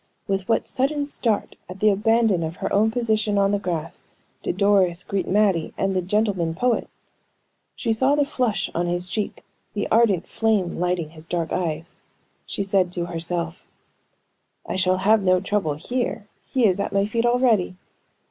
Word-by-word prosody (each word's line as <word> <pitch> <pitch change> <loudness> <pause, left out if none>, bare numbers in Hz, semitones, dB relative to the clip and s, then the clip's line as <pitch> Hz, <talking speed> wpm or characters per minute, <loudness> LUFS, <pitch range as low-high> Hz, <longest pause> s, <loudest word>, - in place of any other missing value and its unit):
With 195 0 -2
what 225 - +3
a - - -15
sudden 285 +2 0
start 230 -7 -2
at 185 +1 -8
the 215 +1 +5
abandon 220 -2 +2
of 160 +1 -3
her - - -3
own 215 +2 +4
position 220 -3 0
on 200 0 +3
the 205 - +1
grass 170 -5 -4 0.4
did - - -3
Doris 195 -3 +3
greet 195 -1 -2
Mattie 195 -5 +1
and 195 0 0
the 185 - +2
"gentleman 190 -3 0
poet!" 245 +5 0 0.9
She 230 -3 0
saw 260 +5 +2
the 290 -1 +2
flush 240 -8 -1
on 175 +1 -1
his 175 +1 -1
cheek, 210 +2 -3 0.3
the 205 - -1
ardent 215 -6 +3
flame 215 -7 0
lighting 175 -3 -1
his 160 0 -13
dark 170 -2 -2
eyes. 165 -1 -3 0.5
She 200 - -2
said 195 -2 +1
to 175 -1 -2
herself: 170 0 -3 1.0
"I - - -4
shall 185 0 +2
have 210 +3 +4
no 185 -1 +3
trouble 195 -6 -1
here; 225 - -3 0.2
he 255 -3 +2
is 195 -2 +3
at 200 - -1
my 200 0 +2
feet 230 +3 0
already. 240 -7 +2
195 Hz, 175 wpm, -23 LUFS, 180-220 Hz, 1.0 s, the